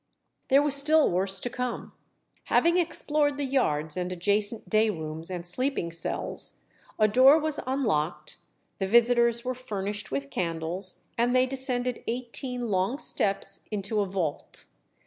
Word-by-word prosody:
There 275 Hz, +2 st, +4 dB
was 295 Hz, -2 st, -1 dB
still 305 Hz, +2 st, +4 dB
worse 190 Hz, +2 st, -1 dB
to -, -, -2 dB
come. 250 Hz, -1 st, -5 dB, 0.5 s
Having 340 Hz, +1 st, +2 dB
explored 300 Hz, -4 st, 0 dB
the 285 Hz, -, -2 dB
yards 155 Hz, -, -1 dB
and 180 Hz, 0 st, -3 dB
adjacent 205 Hz, +5 st, -1 dB
day 220 Hz, 0 st, +2 dB
rooms, 160 Hz, -2 st, -5 dB
and 175 Hz, -2 st, -6 dB
sleeping 250 Hz, -2 st, -1 dB
cells, 165 Hz, 0 st, -1 dB, 0.3 s
a 215 Hz, -, +4 dB
door 260 Hz, +7 st, +6 dB
was 310 Hz, -1 st, -2 dB
unlocked, 175 Hz, -, -2 dB, 0.4 s
the 195 Hz, -, -1 dB
visitors 235 Hz, +2 st, +3 dB
were 255 Hz, -, -2 dB
furnished 210 Hz, -5 st, -5 dB
with 140 Hz, +1 st, -4 dB
candles, 170 Hz, +3 st, -3 dB
and 245 Hz, +2 st, +1 dB
they 255 Hz, 0 st, +4 dB
descended 255 Hz, -2 st, +1 dB
eighteen 245 Hz, 0 st, -4 dB
long 190 Hz, +7 st, 0 dB
steps 195 Hz, -7 st, +4 dB
into 210 Hz, 0 st, -2 dB
a 200 Hz, -, -2 dB
vault. 180 Hz, -6 st, -4 dB
220 Hz, 145 wpm, -26 LUFS, 185-255 Hz, 0.5 s, door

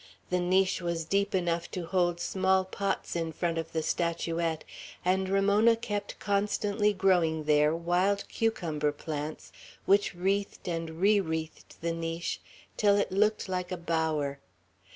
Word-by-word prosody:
The 180 Hz, -, +2 dB
niche 185 Hz, +1 st, +2 dB
was 170 Hz, -2 st, -2 dB
deep 200 Hz, +3 st, +1 dB
enough 170 Hz, -2 st, 0 dB
to 180 Hz, -2 st, -4 dB
hold 175 Hz, -1 st, +1 dB
small 190 Hz, +1 st, +2 dB
pots 195 Hz, 0 st, -2 dB
in 165 Hz, -1 st, -1 dB
front 165 Hz, +1 st, -1 dB
of 165 Hz, 0 st, -5 dB
the 160 Hz, -1 st, -1 dB
statuette; 165 Hz, -1 st, -1 dB, 0.4 s
and 190 Hz, +1 st, +2 dB
Ramona 200 Hz, +4 st, +4 dB
kept 205 Hz, -3 st, -4 dB
constantly 205 Hz, +1 st, +1 dB
growing 180 Hz, -5 st, +2 dB
there 150 Hz, +1 st, +3 dB
wild 180 Hz, +4 st, +1 dB
cucumber 165 Hz, -10 st, 0 dB
plants, 150 Hz, +1 st, -6 dB, 0.3 s
which 200 Hz, -1 st, +3 dB
wreathed 195 Hz, +3 st, -1 dB
and 165 Hz, -1 st, -3 dB
re 205 Hz, +1 st, +5 dB
wreathed 160 Hz, -3 st, -4 dB
the 170 Hz, 0 st, -1 dB
niche 165 Hz, +1 st, -3 dB, 0.4 s
till 205 Hz, -1 st, +4 dB
it 205 Hz, -, 0 dB
looked 210 Hz, +3 st, +2 dB
like 180 Hz, -1 st, -3 dB
a 185 Hz, -, -2 dB
bower. 160 Hz, -4 st, -1 dB
175 Hz, 145 wpm, -29 LUFS, 165-195 Hz, 0.4 s, re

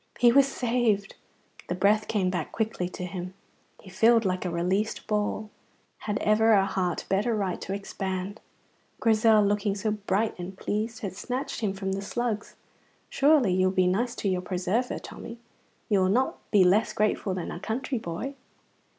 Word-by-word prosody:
He 240 Hz, -1 st, +6 dB
was 275 Hz, +2 st, +6 dB
saved. 235 Hz, -6 st, 0 dB, 0.6 s
The 180 Hz, -, 0 dB
breath 210 Hz, +3 st, +2 dB
came 190 Hz, -4 st, +1 dB
back 175 Hz, -4 st, -3 dB
quickly 220 Hz, -5 st, -2 dB
to 180 Hz, -, -6 dB
him. 180 Hz, 0 st, -6 dB, 0.4 s
He 190 Hz, -, -13 dB
filled 225 Hz, +3 st, +4 dB
like 185 Hz, 0 st, -1 dB
a -, -, 0 dB
released 185 Hz, +5 st, -1 dB
ball. 210 Hz, 0 st, -1 dB, 0.5 s
Had 210 Hz, -1 st, -2 dB
ever 220 Hz, +1 st, +4 dB
a 195 Hz, -2 st, +5 dB
heart 185 Hz, -3 st, -2 dB
better 210 Hz, +4 st, +1 dB
right 195 Hz, -4 st, -2 dB
to -, -, -5 dB
expand? 195 Hz, 0 st, -4 dB, 0.6 s
Grizel, 220 Hz, -1 st, +4 dB
looking 205 Hz, 0 st, +1 dB
so 210 Hz, +2 st, -1 dB
bright 210 Hz, +1 st, 0 dB
and 185 Hz, +2 st, -7 dB
pleased, 220 Hz, +3 st, -3 dB
had 190 Hz, -2 st, -4 dB
snatched 250 Hz, +7 st, -4 dB
him 205 Hz, -3 st, 0 dB
from 195 Hz, 0 st, -3 dB
the 195 Hz, +1 st, -2 dB
Slugs. 220 Hz, +1 st, -3 dB, 0.6 s
Surely 275 Hz, -9 st, +4 dB
you 185 Hz, 0 st, +3 dB
will 185 Hz, -, -1 dB
be 185 Hz, -, +4 dB
nice 225 Hz, +7 st, 0 dB
to -, -, -3 dB
your 185 Hz, -2 st, 0 dB
preserver, 185 Hz, +7 st, -1 dB
Tommy. 230 Hz, -, -9 dB, 0.5 s
You 205 Hz, -3 st, +3 dB
will 185 Hz, 0 st, +3 dB
not 255 Hz, +6 st, +1 dB
be 205 Hz, -3 st, +5 dB
less 190 Hz, +5 st, +3 dB
grateful 210 Hz, -3 st, 0 dB
than 180 Hz, -, -4 dB
a -, -, -6 dB
country 250 Hz, +5 st, -2 dB
boy? 200 Hz, +9 st, -5 dB
205 Hz, 175 wpm, -27 LUFS, 185-225 Hz, 0.6 s, He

